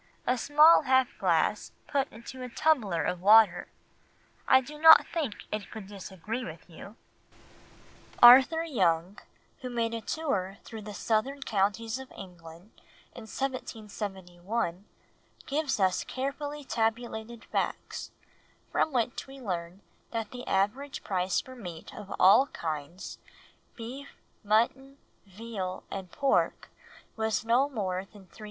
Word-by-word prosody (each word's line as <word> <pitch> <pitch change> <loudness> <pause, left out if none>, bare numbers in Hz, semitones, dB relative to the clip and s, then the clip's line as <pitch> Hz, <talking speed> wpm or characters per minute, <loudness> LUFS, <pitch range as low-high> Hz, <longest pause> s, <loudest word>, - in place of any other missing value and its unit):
A 250 - +2
small 300 +6 +6
half 260 -1 +3
glass - - +1
put 275 -2 -1
into 235 +4 -10
a 250 - -5
tumbler 235 - +1
of 180 +1 -2
water? 205 -3 +6 0.8
I 260 - +7
do 300 +4 -9
not 320 0 +9
think 295 -11 -4
it 210 -1 -4
could 220 -3 -8
disagree 200 +3 -6
with - - -9
you.'" - - -12 1.2
Arthur 265 +7 +8
Young, 185 - 0 0.4
who 255 - -6
made 230 -1 -1
a 230 - -3
tour 200 -11 -2
through 225 -2 -9
the 210 -1 -8
southern 260 +7 -1
counties 220 +3 -1
of 265 - -10
England 175 +1 -12 0.4
in 240 -4 -10
1771, 205 -6 -4 0.6
gives 290 -4 -1
us 185 -2 +2
carefully 285 +2 -4
tabulated 230 -1 -2
facts, - - -3 0.6
from 315 - +1
which 245 +1 -1
we 270 0 -11
learn 180 -4 -5 0.3
that 225 -2 -4
the 250 0 -8
average 215 +9 -1
price 185 -1 0
for 260 - -9
meat 175 -9 -9
of 205 -2 -10
all 200 +9 +7
kinds, 160 - -6 0.6
beef, 255 +5 -8 0.3
mutton, 235 +6 +1 0.3
veal, 195 -2 -6
and 190 -3 -6
pork, 275 -1 0 0.4
was 220 0 -1
no 250 +5 +3
more 190 -7 -3
than 200 -2 -15
3½d. 180 - -20
225 Hz, 130 wpm, -29 LUFS, 190-260 Hz, 1.2 s, not